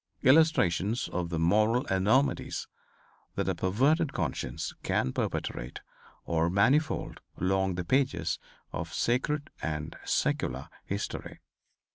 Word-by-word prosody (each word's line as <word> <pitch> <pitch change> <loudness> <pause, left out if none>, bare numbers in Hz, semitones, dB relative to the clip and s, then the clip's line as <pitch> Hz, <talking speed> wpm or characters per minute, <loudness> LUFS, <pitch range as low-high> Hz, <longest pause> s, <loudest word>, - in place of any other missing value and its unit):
Illustrations 125 - +4
of 85 -1 -2
the 85 - -2
moral 110 +9 +3
enormities 105 +9 +1 0.7
that - - -1
a - - +2
perverted 140 - +2
conscience 80 -7 -3
can 65 - 0
perpetrate - - -3 0.4
are 85 0 +1
manifold 130 - +2 0.2
along 95 +1 +1
the 90 -1 -3
pages 95 - +1 0.3
of - - -4
sacred 145 +5 0
and 75 0 -3
secular 65 +1 -1 0.2
history. 100 +1 -4
95 Hz, 105 wpm, -29 LUFS, 85-130 Hz, 0.7 s, Illustrations